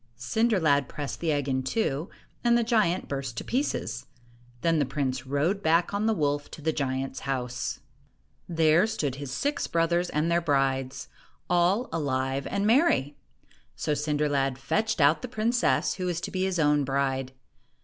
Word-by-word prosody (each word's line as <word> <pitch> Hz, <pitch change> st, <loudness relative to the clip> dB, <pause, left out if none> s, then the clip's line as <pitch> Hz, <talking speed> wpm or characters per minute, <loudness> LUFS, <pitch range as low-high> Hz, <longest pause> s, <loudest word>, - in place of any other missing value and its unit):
Cinder 215 Hz, -, +1 dB
lad 145 Hz, -5 st, +2 dB
pressed 145 Hz, -2 st, -5 dB
the 165 Hz, -2 st, 0 dB
egg 145 Hz, -2 st, -1 dB
in 130 Hz, -1 st, 0 dB
two, 145 Hz, +1 st, -1 dB, 0.3 s
and 235 Hz, 0 st, +4 dB
the 240 Hz, -, +2 dB
giant 215 Hz, -6 st, +1 dB
burst 135 Hz, -5 st, -4 dB
to -, -, -3 dB
pieces. 245 Hz, -, -2 dB, 0.5 s
Then 165 Hz, -2 st, +2 dB
the -, -, +3 dB
prince 130 Hz, -1 st, -2 dB
rode 155 Hz, +9 st, 0 dB
back 165 Hz, +2 st, +2 dB
on 205 Hz, +2 st, 0 dB
the 225 Hz, -, +3 dB
wolf 145 Hz, -3 st, -1 dB
to -, -, -10 dB
the 160 Hz, 0 st, +1 dB
giant's 135 Hz, -2 st, -2 dB
house. 125 Hz, -3 st, -3 dB, 0.7 s
There 165 Hz, +3 st, +4 dB
stood 145 Hz, -, -2 dB
his 140 Hz, -2 st, -6 dB
six 285 Hz, -, -1 dB
brothers 170 Hz, +1 st, +1 dB
and 155 Hz, +3 st, 0 dB
their 170 Hz, 0 st, +3 dB
brides, 135 Hz, -4 st, 0 dB, 0.4 s
all 180 Hz, +7 st, +3 dB
alive 135 Hz, -3 st, -1 dB
and 200 Hz, 0 st, -1 dB
merry. 230 Hz, -, +3 dB, 0.6 s
So 150 Hz, -, -1 dB
Cinder 150 Hz, 0 st, 0 dB
lad 135 Hz, -2 st, 0 dB
fetched 215 Hz, +10 st, -1 dB
out 145 Hz, +2 st, +4 dB
the 250 Hz, -, -4 dB
princess 235 Hz, +1 st, +1 dB
who 185 Hz, -1 st, -3 dB
was 175 Hz, -2 st, -1 dB
to -, -, -5 dB
be 185 Hz, 0 st, 0 dB
his 190 Hz, -2 st, -1 dB
own 150 Hz, -2 st, +3 dB
bride. 135 Hz, -1 st, -1 dB
150 Hz, 170 wpm, -27 LUFS, 135-185 Hz, 0.7 s, and